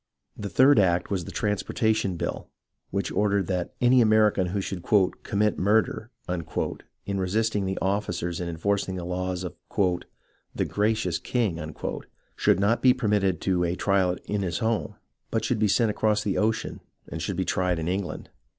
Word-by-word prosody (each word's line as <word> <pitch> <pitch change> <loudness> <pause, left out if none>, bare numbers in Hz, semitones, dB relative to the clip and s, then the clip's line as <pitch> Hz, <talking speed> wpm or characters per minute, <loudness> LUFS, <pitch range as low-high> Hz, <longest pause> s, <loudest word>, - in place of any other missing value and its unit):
The 100 -1 -5
third 130 +8 +5
act 90 -2 +2
was 95 -4 -1
the - - -7
Transportation 105 -2 0
Bill, - - -4 0.4
which 100 0 -2
ordered 100 -2 +1
that 90 -1 -3
any 125 +1 +5
American 110 -4 +4
who 95 +3 -2
should 95 -2 -4 0.4
"commit 105 +1 0
murder" 110 +3 +1 0.2
in 90 +3 -4
resisting 105 +1 0
the 95 - -2
officers 90 -3 -1
in 85 - -3
enforcing 95 +3 -1
the 90 -2 -5
laws 90 0 -2
of 90 - -5
" 90 -3 -4
the - - 0
gracious 105 -4 0
king," 110 -9 -1 0.8
should - - +3
not 105 +4 +2
be 130 - +6
entitled 100 -6 +1
to 90 -2 +1
a 85 +1 0
trial 95 -2 +1
in 105 -1 -1
his 90 -3 -1
home, 110 -2 -1 0.3
but 110 -1 -1
should 115 -1 0
be 105 - +3
sent 110 +2 +3
across 105 0 +1
the 100 - -1
ocean, 110 +1 0 0.3
and 80 - -6
should 90 +2 -3
be 95 - 0
tried 90 -1 0
in 80 0 -3
England. 95 0 -3
100 Hz, 170 wpm, -26 LUFS, 90-105 Hz, 0.8 s, be